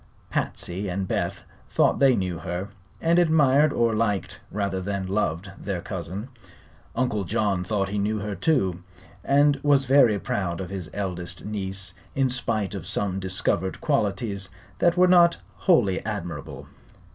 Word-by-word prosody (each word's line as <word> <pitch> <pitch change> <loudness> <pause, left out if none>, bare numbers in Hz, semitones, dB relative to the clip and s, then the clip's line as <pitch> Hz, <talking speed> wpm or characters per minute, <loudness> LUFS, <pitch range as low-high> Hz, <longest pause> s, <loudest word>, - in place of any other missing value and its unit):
Patsy 95 +3 -2
and 95 +1 -2
Beth - - -2 0.3
thought - - +2
they 135 -2 +6
knew 90 -3 -2
her, 90 +3 -4 0.3
and 170 +1 +3
admired 150 -3 +4
or 115 -3 +2
liked 100 -4 -1
rather 100 -2 -2
than 100 0 -2
loved 95 -1 -1
their 95 -3 -3
cousin. 95 +6 -5 0.7
Uncle 115 -5 0
John 95 +1 0
thought 100 0 -1
he 105 0 -2
knew 105 +2 0
her, 105 0 -3
too, 95 - +1 0.4
and 145 0 +4
was 140 -2 +3
very 130 -5 +5
proud 90 -4 -2
of 95 0 -5
his 95 -4 -5
eldest 90 -3 -4
niece 95 -2 -3 0.2
in 135 -1 +2
spite 110 -5 -1
of 100 - -6
some 95 -2 0
discovered 95 -1 -1
qualities 100 -7 -1 0.3
that 175 0 +3
were 180 - +7
not 175 -2 +6 0.2
wholly 110 - +2
admirable. 90 -9 -5
100 Hz, 145 wpm, -25 LUFS, 95-130 Hz, 0.7 s, were